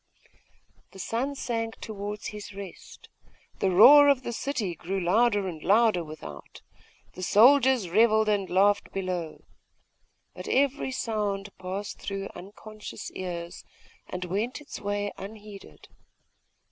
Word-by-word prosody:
The -, -, -12 dB
sun 240 Hz, +9 st, -2 dB
sank 230 Hz, -3 st, -3 dB
towards 210 Hz, -1 st, -6 dB
his 210 Hz, -1 st, -9 dB
rest; 195 Hz, -2 st, -10 dB, 0.5 s
the 195 Hz, -, +2 dB
roar 280 Hz, +11 st, +8 dB
of 270 Hz, -2 st, +2 dB
the 240 Hz, -, -4 dB
city 225 Hz, -8 st, -2 dB
grew 190 Hz, +4 st, -4 dB
louder 205 Hz, +2 st, +2 dB
and 160 Hz, -4 st, -6 dB
louder 210 Hz, -2 st, +3 dB
without; 155 Hz, -, -11 dB, 0.5 s
the 185 Hz, -, -9 dB
soldiers 250 Hz, +2 st, +5 dB
revelled 220 Hz, +3 st, +4 dB
and 205 Hz, -3 st, 0 dB
laughed 200 Hz, +2 st, +2 dB
below: 180 Hz, -4 st, -4 dB, 0.9 s
but -, -, -9 dB
every 275 Hz, 0 st, +1 dB
sound 205 Hz, -5 st, -3 dB
passed 190 Hz, +2 st, -5 dB
through 195 Hz, -1 st, -5 dB
unconscious 215 Hz, +2 st, -9 dB
ears, 175 Hz, -2 st, -6 dB, 0.5 s
and 180 Hz, 0 st, -4 dB
went 210 Hz, -, -2 dB
its 295 Hz, -, -9 dB
way 205 Hz, 0 st, -2 dB
unheeded. 205 Hz, 0 st, -11 dB
205 Hz, 120 wpm, -27 LUFS, 185-225 Hz, 0.9 s, roar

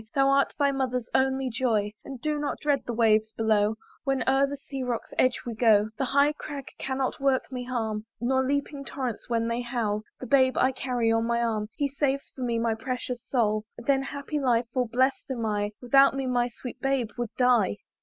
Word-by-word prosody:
Thou 275 Hz, 0 st, +4 dB
art 275 Hz, 0 st, +2 dB
thy 285 Hz, -2 st, +3 dB
mother's 250 Hz, -3 st, -1 dB
only 265 Hz, 0 st, +2 dB
joy; 220 Hz, -4 st, 0 dB
And 270 Hz, -2 st, -8 dB
do 300 Hz, +3 st, -1 dB
not 290 Hz, -1 st, -2 dB
dread 285 Hz, -3 st, +1 dB
the -, -, -1 dB
waves 220 Hz, -1 st, +3 dB
below, 215 Hz, -1 st, +2 dB, 0.3 s
When 270 Hz, -2 st, 0 dB
o'er 270 Hz, +1 st, +4 dB
the 285 Hz, +1 st, -5 dB
sea 275 Hz, -1 st, -7 dB
rock's 245 Hz, -2 st, -3 dB
edge 255 Hz, 0 st, +2 dB
we 240 Hz, -, -3 dB
go; 215 Hz, -2 st, +4 dB
The 270 Hz, -, +1 dB
high 280 Hz, +3 st, +3 dB
crag 285 Hz, -2 st, -7 dB
cannot 265 Hz, -1 st, -2 dB
work 270 Hz, -1 st, +1 dB
me 250 Hz, -1 st, -4 dB
harm, 220 Hz, -3 st, -3 dB
Nor 260 Hz, +3 st, +2 dB
leaping 280 Hz, +1 st, -2 dB
torrents 255 Hz, -6 st, -5 dB
when 230 Hz, -1 st, +1 dB
they 235 Hz, +1 st, -1 dB
howl; 235 Hz, -4 st, -1 dB, 0.2 s
The -, -, -6 dB
babe 260 Hz, -1 st, +3 dB
I 260 Hz, -, +4 dB
carry 250 Hz, -3 st, 0 dB
on 225 Hz, 0 st, +2 dB
my 235 Hz, 0 st, +1 dB
arm, 215 Hz, -2 st, -1 dB
He 285 Hz, -, 0 dB
saves 275 Hz, 0 st, -1 dB
for 260 Hz, -, -8 dB
me 235 Hz, -2 st, 0 dB
my 230 Hz, 0 st, +1 dB
precious 250 Hz, +1 st, -4 dB
soul; 215 Hz, -4 st, +1 dB
Then 270 Hz, +3 st, +1 dB
happy 285 Hz, +2 st, -4 dB
lie, 245 Hz, -4 st, +2 dB
for 250 Hz, -2 st, +1 dB
blest 260 Hz, +5 st, +1 dB
am 240 Hz, -4 st, -2 dB
I; 205 Hz, -1 st, 0 dB
Without 275 Hz, +3 st, +5 dB
me 270 Hz, -1 st, -2 dB
my 245 Hz, -1 st, +1 dB
sweet 245 Hz, +1 st, -9 dB
babe 270 Hz, -5 st, 0 dB
would 240 Hz, -3 st, -3 dB
die. 245 Hz, -, +3 dB
250 Hz, 205 wpm, -27 LUFS, 230-270 Hz, 0.3 s, Without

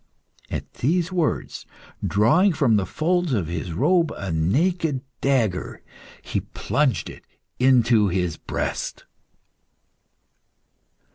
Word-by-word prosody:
At -, -, -5 dB
these 170 Hz, +6 st, 0 dB
words, 175 Hz, -4 st, -2 dB, 0.4 s
drawing 145 Hz, -, +3 dB
from 135 Hz, -7 st, +3 dB
the 100 Hz, -2 st, +1 dB
folds 175 Hz, -1 st, 0 dB
of 100 Hz, -8 st, 0 dB
his 85 Hz, +1 st, -4 dB
robe 165 Hz, -, +2 dB
a 95 Hz, -4 st, -4 dB
naked 140 Hz, -, +1 dB, 0.2 s
dagger, 115 Hz, -10 st, 0 dB, 0.4 s
he -, -, -2 dB
plunged 130 Hz, -, -1 dB
it -, -, -11 dB, 0.4 s
into 120 Hz, -4 st, +4 dB
his 90 Hz, -3 st, -1 dB
breast. -, -, -4 dB
130 Hz, 100 wpm, -23 LUFS, 95-165 Hz, 0.4 s, into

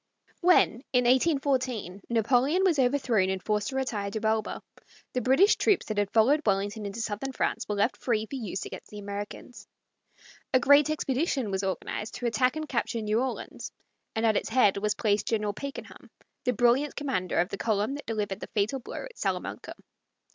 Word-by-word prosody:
When, 340 Hz, -8 st, +4 dB
in 250 Hz, -1 st, +4 dB
1814, 255 Hz, -, +1 dB
Napoleon 250 Hz, -, +2 dB
was 345 Hz, -7 st, +3 dB
overthrown 245 Hz, -7 st, +2 dB
and 190 Hz, 0 st, -1 dB
forced 210 Hz, -1 st, 0 dB
to 265 Hz, -, -4 dB
retire 220 Hz, -7 st, -2 dB
to 220 Hz, -, -3 dB
Elba, 220 Hz, -1 st, -1 dB, 0.5 s
the 250 Hz, -, 0 dB
British 270 Hz, -, +4 dB
troops 415 Hz, -4 st, +2 dB
that 215 Hz, -1 st, -2 dB
had 205 Hz, -1 st, 0 dB
followed 245 Hz, +8 st, +4 dB
Wellington 205 Hz, 0 st, 0 dB
into 200 Hz, +3 st, -5 dB
southern 220 Hz, +5 st, -3 dB
France -, -, -2 dB
were 210 Hz, -, 0 dB
left 205 Hz, +5 st, +1 dB
free 220 Hz, -3 st, 0 dB
for 220 Hz, -, -14 dB
use 205 Hz, -9 st, -4 dB
against -, -, -9 dB
the 210 Hz, -, -10 dB
Americans. 205 Hz, +4 st, -7 dB, 0.9 s
A -, -, +7 dB
great 285 Hz, +3 st, +5 dB
expedition 275 Hz, -5 st, -1 dB
was 190 Hz, 0 st, -1 dB
organized 195 Hz, +3 st, -3 dB
to 245 Hz, -, -5 dB
attack 245 Hz, +3 st, +2 dB
and 310 Hz, 0 st, -4 dB
capture 235 Hz, -3 st, -2 dB
New 215 Hz, +2 st, +1 dB
Orleans, 260 Hz, -1 st, -5 dB, 0.4 s
and 225 Hz, +1 st, +1 dB
at 220 Hz, -2 st, +3 dB
its -, -, -2 dB
head 225 Hz, -5 st, +4 dB
was 210 Hz, +1 st, 0 dB
placed 210 Hz, -2 st, 0 dB
General 210 Hz, -2 st, 0 dB
Pakenham, 280 Hz, +6 st, -8 dB, 0.4 s
the 250 Hz, -, +2 dB
brilliant 245 Hz, +5 st, +2 dB
commander 265 Hz, -11 st, -2 dB
of 175 Hz, +2 st, +2 dB
the -, -, -5 dB
column 215 Hz, +2 st, 0 dB
that 290 Hz, -, -8 dB
delivered 210 Hz, -3 st, -2 dB
the -, -, -7 dB
fatal 215 Hz, +6 st, +1 dB
blow 245 Hz, -, -7 dB
at -, -, -13 dB
Salamanca. -, -, -3 dB
230 Hz, 185 wpm, -28 LUFS, 205-265 Hz, 0.9 s, A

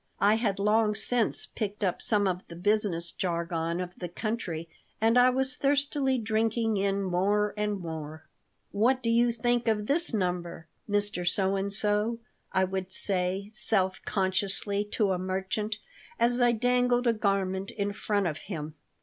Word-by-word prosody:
I 205 Hz, +1 st, +5 dB
had 220 Hz, -3 st, 0 dB
long 210 Hz, +1 st, +2 dB
since 235 Hz, +1 st, +1 dB
picked 210 Hz, 0 st, -4 dB
up 185 Hz, -3 st, 0 dB
some 205 Hz, -3 st, +2 dB
of 180 Hz, -1 st, -1 dB
the 170 Hz, -, -10 dB
business 180 Hz, -3 st, +1 dB
jargon 170 Hz, -1 st, -2 dB
of 180 Hz, -1 st, -5 dB
the 175 Hz, -, -4 dB
country 175 Hz, -5 st, -4 dB, 0.3 s
and 225 Hz, +2 st, +3 dB
I 250 Hz, 0 st, +7 dB
was 260 Hz, 0 st, +1 dB
thirstily 280 Hz, -1 st, +1 dB
drinking 225 Hz, 0 st, 0 dB
in 195 Hz, 0 st, 0 dB
more 200 Hz, +3 st, +1 dB
and 210 Hz, -1 st, -1 dB
more 160 Hz, -2 st, -7 dB, 0.5 s
"What 245 Hz, +5 st, +2 dB
do 230 Hz, -, +1 dB
you 235 Hz, +1 st, +4 dB
think 240 Hz, +1 st, 0 dB
of 210 Hz, -2 st, +1 dB
this 335 Hz, +8 st, +2 dB
number, 180 Hz, -5 st, -2 dB, 0.2 s
Mr. 205 Hz, -3 st, 0 dB
So 190 Hz, +1 st, +2 dB
and 195 Hz, +1 st, -2 dB
so?" 210 Hz, +2 st, +1 dB, 0.3 s
I 190 Hz, 0 st, +2 dB
would 190 Hz, 0 st, -3 dB
say, 190 Hz, +1 st, 0 dB
self 190 Hz, -3 st, 0 dB
consciously, 195 Hz, +1 st, 0 dB
to 205 Hz, -1 st, 0 dB
a 180 Hz, -, 0 dB
merchant, 190 Hz, +3 st, -2 dB, 0.4 s
as 245 Hz, +1 st, +2 dB
I 240 Hz, 0 st, +5 dB
dangled 245 Hz, +1 st, +2 dB
a 235 Hz, -, +4 dB
garment 195 Hz, -2 st, -1 dB
in 205 Hz, -1 st, -3 dB
front 205 Hz, -1 st, -1 dB
of 155 Hz, -3 st, -2 dB
him. 155 Hz, -6 st, -6 dB
205 Hz, 160 wpm, -28 LUFS, 185-225 Hz, 0.5 s, I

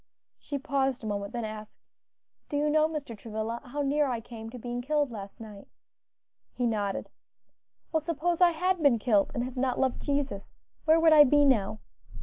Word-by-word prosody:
She 285 Hz, -, -4 dB
paused 270 Hz, -3 st, -1 dB
a -, -, -5 dB
moment; 200 Hz, -1 st, -3 dB
then 235 Hz, -2 st, -3 dB
asked, 215 Hz, 0 st, -9 dB, 0.6 s
"Do 290 Hz, -, -1 dB
you 300 Hz, +1 st, +1 dB
know, 310 Hz, 0 st, +4 dB
Mr. 295 Hz, -7 st, -5 dB
Travilla, 220 Hz, +2 st, -4 dB
how 285 Hz, +4 st, -3 dB
near 290 Hz, +1 st, +2 dB
I 245 Hz, -3 st, -2 dB
came 225 Hz, -1 st, -9 dB
to 250 Hz, -, -9 dB
being 245 Hz, +1 st, -4 dB
killed 290 Hz, 0 st, 0 dB
last 200 Hz, -3 st, -8 dB
night?" 210 Hz, -3 st, -11 dB, 0.9 s
He 245 Hz, -, -1 dB
nodded. 205 Hz, -4 st, -2 dB, 0.8 s
"Well, 320 Hz, -, +1 dB
suppose 335 Hz, +2 st, -1 dB
I 355 Hz, -, +8 dB
had 360 Hz, +2 st, 0 dB
been 280 Hz, -6 st, +5 dB
killed, 210 Hz, -3 st, +2 dB
and 240 Hz, -, 0 dB
had 255 Hz, +1 st, -6 dB
not 255 Hz, 0 st, 0 dB
loved 260 Hz, -2 st, 0 dB
Jesus; 280 Hz, -8 st, -2 dB, 0.3 s
where 320 Hz, +1 st, +5 dB
would 325 Hz, -1 st, +6 dB
I 300 Hz, -1 st, +10 dB
be 290 Hz, +1 st, +4 dB
now?" 215 Hz, -5 st, +1 dB
255 Hz, 185 wpm, -28 LUFS, 220-295 Hz, 0.9 s, I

